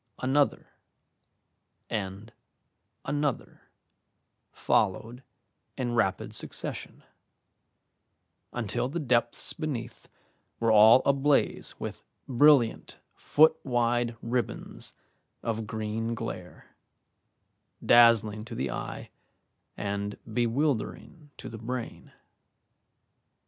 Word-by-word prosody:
Another 135 Hz, +2 st, +1 dB, 1.2 s
and 105 Hz, +2 st, -5 dB, 0.7 s
another 145 Hz, -2 st, -3 dB, 0.8 s
followed 115 Hz, +6 st, 0 dB, 0.6 s
in 125 Hz, -3 st, -2 dB
rapid 115 Hz, -5 st, 0 dB
succession, -, -, -5 dB, 1.5 s
until 120 Hz, +1 st, -2 dB
the 170 Hz, +5 st, -3 dB
depths 120 Hz, -5 st, +1 dB
beneath 125 Hz, -7 st, -5 dB, 0.5 s
were 115 Hz, -1 st, +2 dB
all 110 Hz, +4 st, +7 dB
ablaze 140 Hz, +1 st, +1 dB
with -, -, -6 dB, 0.3 s
brilliant 135 Hz, -2 st, +3 dB, 0.2 s
foot 155 Hz, +1 st, +3 dB
wide 120 Hz, -2 st, 0 dB
ribbons 120 Hz, +1 st, -4 dB, 0.5 s
of 115 Hz, -1 st, -3 dB
green 110 Hz, +1 st, -3 dB
glare, 95 Hz, -6 st, -8 dB, 1.1 s
dazzling 115 Hz, -3 st, +5 dB
to -, -, -8 dB
the -, -, -2 dB
eye -, -, -6 dB, 0.7 s
and 100 Hz, 0 st, -3 dB
bewildering 125 Hz, +6 st, -2 dB
to -, -, -9 dB
the 115 Hz, -, -8 dB
brain. 120 Hz, +1 st, -6 dB
120 Hz, 80 wpm, -28 LUFS, 110-130 Hz, 1.5 s, all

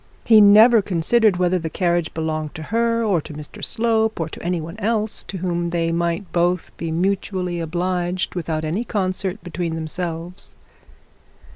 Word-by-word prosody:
He 220 Hz, -2 st, +7 dB
never 215 Hz, +3 st, +7 dB
considered 195 Hz, +3 st, +2 dB
whether 180 Hz, 0 st, +2 dB
the 165 Hz, -1 st, -4 dB
carriage 175 Hz, -1 st, 0 dB
belonged 155 Hz, -1 st, -3 dB
to 160 Hz, -, -6 dB
her 230 Hz, 0 st, +2 dB
or 195 Hz, -7 st, +1 dB
to 150 Hz, -, -10 dB
Mr 150 Hz, +7 st, -9 dB
Slope, 220 Hz, -2 st, +1 dB
or 165 Hz, -1 st, -2 dB
to -, -, -9 dB
any 175 Hz, 0 st, -1 dB
one 165 Hz, +5 st, -7 dB
else 215 Hz, 0 st, -1 dB
to 190 Hz, -, -6 dB
whom 175 Hz, -1 st, -2 dB
they 165 Hz, -1 st, 0 dB
might 170 Hz, +3 st, -2 dB
both 175 Hz, 0 st, 0 dB
be 165 Hz, -1 st, -4 dB
mutually 180 Hz, 0 st, -1 dB
obliged 180 Hz, +2 st, -2 dB
without 160 Hz, -3 st, -3 dB
any 175 Hz, +9 st, -1 dB
concert 190 Hz, -2 st, -2 dB
between 170 Hz, -1 st, -3 dB
themselves. 170 Hz, +3 st, -5 dB
180 Hz, 160 wpm, -21 LUFS, 165-200 Hz, -, He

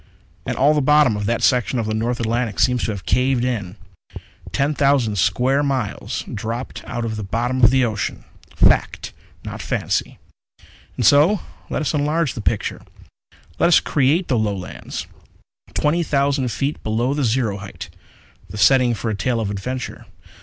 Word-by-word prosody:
And -, -, -2 dB
all 145 Hz, +3 st, +4 dB
the 150 Hz, -, +1 dB
bottom 150 Hz, -4 st, +4 dB
of 105 Hz, -1 st, -3 dB
that 115 Hz, 0 st, 0 dB
section 125 Hz, 0 st, +2 dB
of 115 Hz, -, -1 dB
the 110 Hz, -, -2 dB
North 120 Hz, +3 st, -1 dB
Atlantic 115 Hz, -1 st, -1 dB
seems 125 Hz, 0 st, +2 dB
to -, -, -1 dB
have 100 Hz, -4 st, -7 dB
caved 125 Hz, +2 st, +1 dB
in. 105 Hz, -7 st, -3 dB, 0.8 s
Ten 140 Hz, +2 st, +1 dB
thousand 135 Hz, -7 st, +2 dB
square 130 Hz, -, +2 dB
miles 135 Hz, -7 st, -2 dB
dropped 115 Hz, +4 st, -5 dB
out 120 Hz, -2 st, -3 dB
of 110 Hz, -1 st, -3 dB
the 105 Hz, -, -4 dB
bottom 120 Hz, +6 st, -1 dB
of 120 Hz, -, +9 dB
the 130 Hz, -1 st, +3 dB
ocean! 110 Hz, -3 st, -3 dB, 0.3 s
Fact, -, -, +2 dB, 0.3 s
not -, -, -6 dB
fancy._ -, -, -2 dB, 0.8 s
_And -, -, 0 dB
so 160 Hz, +8 st, +5 dB, 0.3 s
let -, -, -2 dB
us 150 Hz, -, -1 dB
enlarge 150 Hz, 0 st, 0 dB
the 115 Hz, -, -6 dB
picture. 105 Hz, 0 st, -1 dB, 0.8 s
Let -, -, +4 dB
us 175 Hz, -, +6 dB
create 150 Hz, +6 st, +1 dB
the 125 Hz, -6 st, +1 dB
Lowlands 100 Hz, -4 st, -4 dB, 0.7 s
twenty 155 Hz, +4 st, +1 dB
thousand 140 Hz, -4 st, 0 dB
feet 140 Hz, +6 st, -2 dB
below 115 Hz, +5 st, 0 dB
the 145 Hz, 0 st, -1 dB
zero 115 Hz, -4 st, 0 dB
height 100 Hz, 0 st, -9 dB, 0.6 s
the 105 Hz, -, -8 dB
setting 125 Hz, +1 st, +4 dB
for 110 Hz, +1 st, -3 dB
a -, -, -2 dB
tale 120 Hz, +3 st, -1 dB
of 105 Hz, -3 st, -2 dB
adventure. 125 Hz, +6 st, -5 dB
125 Hz, 165 wpm, -21 LUFS, 110-140 Hz, 0.8 s, of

